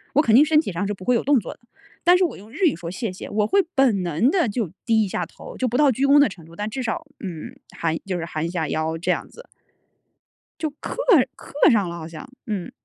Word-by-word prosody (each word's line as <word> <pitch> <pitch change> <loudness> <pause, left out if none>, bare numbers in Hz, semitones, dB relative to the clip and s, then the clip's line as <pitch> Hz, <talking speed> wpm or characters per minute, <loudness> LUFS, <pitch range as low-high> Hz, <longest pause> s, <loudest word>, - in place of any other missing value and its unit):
我 295 - +6
肯 225 -6 +3
定 285 - +8
身 305 0 +4
体 315 - -2
上 180 +4 -2
是 205 - -2
不 185 -1 -11
会 250 - +3
有 - - 0
动 280 -2 +4
作 - - -7
的， - - -29 0.4
但 355 +1 +6
是 370 - +3
我 - - -4
用 210 +4 -14
日 380 +6 0
语 310 - +3
说 170 0 -7
谢 190 0 -4
谢， - - -8
我 210 0 +1
会 395 - +3
本 240 -9 +3
能 175 - +2
地 345 - +2
就 205 -4 -2 0.2
低 225 -2 +3
一 - - -2
下 180 -2 -2
头， - - -12
就 260 - -1
不 245 +2 -1
到 290 -2 +5
鞠 270 +4 0
躬 285 +1 +6
的 285 - +6
程 185 -5 -10
度， 165 - -16
但 210 +1 -3
至 260 +3 -4
少， 320 +8 -3 0.2
嗯， 175 -6 -7 0.2
含 160 -1 -1
就 185 -2 -2
是 165 - -4
含 160 -1 -3
一 - - -2
下 165 -4 -2
腰 160 +2 -1
这 165 - 0
样 - - -2
子。 - - -14 1.1
就 315 - -1
刻 - - -6 0.4
刻 - - -14 0.2
上 205 -5 +2
了 170 - -6
好 160 -1 -7
像。 160 -2 -10 0.2
嗯。 200 -5 -3
210 Hz, 290 characters per minute, -23 LUFS, 175-275 Hz, 1.1 s, 定